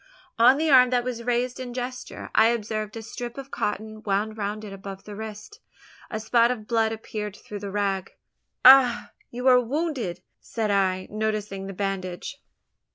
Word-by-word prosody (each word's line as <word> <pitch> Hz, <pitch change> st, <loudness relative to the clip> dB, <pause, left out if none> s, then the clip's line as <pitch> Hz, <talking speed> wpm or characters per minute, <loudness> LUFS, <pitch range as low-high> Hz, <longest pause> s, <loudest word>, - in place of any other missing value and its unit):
On 250 Hz, +4 st, +7 dB
the 315 Hz, 0 st, +1 dB
arm 255 Hz, -2 st, +7 dB
that 245 Hz, -1 st, +1 dB
was 245 Hz, -2 st, -4 dB
raised 245 Hz, +1 st, -1 dB
in 245 Hz, -1 st, -6 dB
gesture, 250 Hz, 0 st, -6 dB
I 220 Hz, -, +6 dB
observed 215 Hz, -2 st, -2 dB
a 225 Hz, -, -7 dB
strip 240 Hz, +2 st, -7 dB
of 275 Hz, 0 st, -8 dB
cotton 215 Hz, +1 st, -3 dB
wound 210 Hz, +1 st, -1 dB
round 210 Hz, 0 st, -4 dB
it 200 Hz, -, -8 dB
above 195 Hz, 0 st, -8 dB
the 210 Hz, -, -9 dB
wrist. 220 Hz, -, -8 dB, 0.5 s
A 215 Hz, -, -3 dB
spot 230 Hz, +2 st, +3 dB
of 235 Hz, -4 st, -3 dB
blood 225 Hz, -1 st, +1 dB
appeared 215 Hz, -2 st, -5 dB
through 205 Hz, -1 st, -8 dB
the 200 Hz, 0 st, -6 dB
rag! 195 Hz, -2 st, -2 dB, 0.5 s
"Ha! 255 Hz, -2 st, +7 dB, 0.2 s
you 245 Hz, +1 st, -6 dB
are 250 Hz, -1 st, +7 dB
wounded?" 245 Hz, -, -3 dB, 0.2 s
said 220 Hz, -3 st, -2 dB
I, 185 Hz, -2 st, +1 dB
noticing 210 Hz, -2 st, -2 dB
the 195 Hz, -, -6 dB
bandage. 195 Hz, +6 st, -4 dB
220 Hz, 170 wpm, -25 LUFS, 205-245 Hz, 0.5 s, On